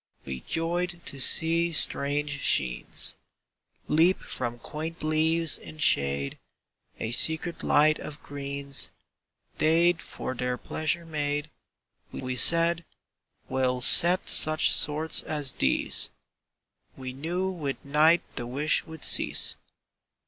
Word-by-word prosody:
We 65 -1 -7
joyed 175 - -3
to 135 - -6
see 165 +4 +2
strange 145 0 +1
sheens 60 -3 +1 0.7
Leap 165 +5 +2
from 120 -1 -6
quaint 155 +6 -8
leaves 160 +1 0
in 155 - -13
shade; 70 - +1 0.6
A 110 - -4
secret 160 +7 -1
light 155 +1 +2
of 150 -1 -10
greens 140 -1 -4 0.7
They'd 165 +2 +2
for - - -7
their 125 0 -4
pleasure 165 +5 -3
made. 150 -1 -4 0.6
We 130 -1 -6
said: 170 +4 +3 0.6
"We'll 130 -1 -2
set 175 +7 +4
such 155 0 +6
sorts 155 +1 0
as 150 -4 -2
these!" 65 - 0 0.9
—We 130 -1 -8
knew 175 +7 -4
with 145 -8 -6
night 155 +4 +2
the 120 - -4
wish 145 +5 +1
would 160 -1 -6
cease. - - +6
150 Hz, 110 wpm, -26 LUFS, 135-165 Hz, 0.9 s, such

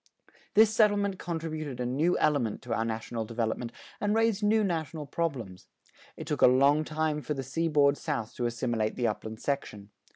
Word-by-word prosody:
This 220 +1 +6
settlement 205 -3 +2
contributed 155 -5 -4
a 125 - -1
new 145 +8 +1
element 135 -8 +1
to 120 - -3
our 115 - 0
national 115 0 -3
development 115 +1 -2 0.3
and 210 +1 +1
raised 225 -2 +2
new 215 +1 +3
national 160 -5 -2
problems. 130 - -4 0.5
It - - -6
took - - -2
a - - +9
long 140 +4 +4
time 155 -1 -1
for 150 - -3
the 135 - -4
seaboard 145 +1 +2
South 145 -9 -3
to 120 - 0
assimilate 115 -2 -1
the 120 - -1
upland 110 0 -3
section. 105 -8 -3
145 Hz, 170 wpm, -29 LUFS, 120-165 Hz, 0.5 s, a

